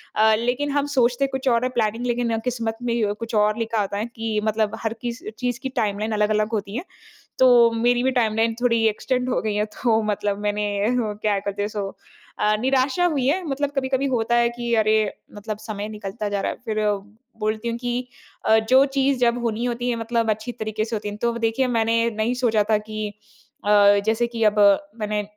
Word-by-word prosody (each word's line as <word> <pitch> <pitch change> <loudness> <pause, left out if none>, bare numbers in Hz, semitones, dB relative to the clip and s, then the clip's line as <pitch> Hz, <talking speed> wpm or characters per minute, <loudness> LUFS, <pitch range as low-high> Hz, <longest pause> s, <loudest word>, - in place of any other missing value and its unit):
अ, 220 0 +5
लेकिन 250 +5 -1
हम 285 0 +1
सोचते 250 +2 +3
कुछ 265 0 -4
और 235 0 +2
है 255 - +1
प्लानिंग, 225 +1 0
लेकिन 240 -2 0
किस्मत 230 -3 -2
में 230 -4 0
कुछ 230 +1 -6
और 210 +1 +3
लिखा 225 -1 -1
होता 200 0 -3
है 210 - -1
कि 225 -1 -1
मतलब 215 0 0
हर 220 - 0
किस 240 +3 -4 0.2
चीज़ 245 -1 -2
की 265 -1 -4
टाइमलाइन 215 -3 -1
अलग-अलग 210 0 +1
होती 205 -1 -3
है। 285 - -3 0.6
तो 245 -2 +6
मेरी 240 +2 +2
भी 265 - +2
टाइमलाइन 225 0 +1
थोड़ी 230 -2 +2
एक्सटेंड 250 +4 -1
हो - - +1
गई 215 -1 -1
है। 210 0 +1
तो 225 -2 +2
मतलब 205 -1 -1
मैंने 210 0 0 0.3
वो 215 -3 -1
क्या 205 -2 +2
करते 200 0 -3
हैं, 205 - -1
सो 205 -2 -4 0.5
अ, 210 0 +2
निराशा 265 +6 +2
हुई 285 -7 0
है। 340 +8 +1
मतलब 280 +1 -1
कभी-कभी 265 0 0
होता 240 -3 +1
है 235 0 +4
कि 235 -1 -1
अरे! 215 0 +3 0.4
मतलब 210 0 -5
समय 215 -1 -5
निकलता 210 0 -5
जा 205 -1 -1
रहा - - -1
है। - - -10
फिर 215 -2 -1 0.6
बोलती 215 +2 -1
हूँ 230 - -2
कि 245 +1 -3 0.4
अ, 220 - +6
जो 255 +5 +5
चीज़ 270 0 +2
जब 240 0 +3
होनी 230 0 -1
होती 245 0 -2
है 235 - -1
मतलब 230 0 0
अच्छी 220 +3 -3
तरीके 215 -2 -3
से 225 0 -3
होती 210 0 -4
है। 205 - -5
तो 235 +2 0
देखिए, 230 +3 +1
मैंने 230 -1 +1
नहीं 220 +2 -1
सोचा 220 -2 +3
था 215 - +4
कि 215 0 -5 0.6
अ, - - -2 0.4
जैसे 225 +2 +2
कि 235 -1 -5
अब 210 0 +3 0.4
मैंने 210 0 -1
225 Hz, 210 wpm, -23 LUFS, 215-245 Hz, 0.6 s, तो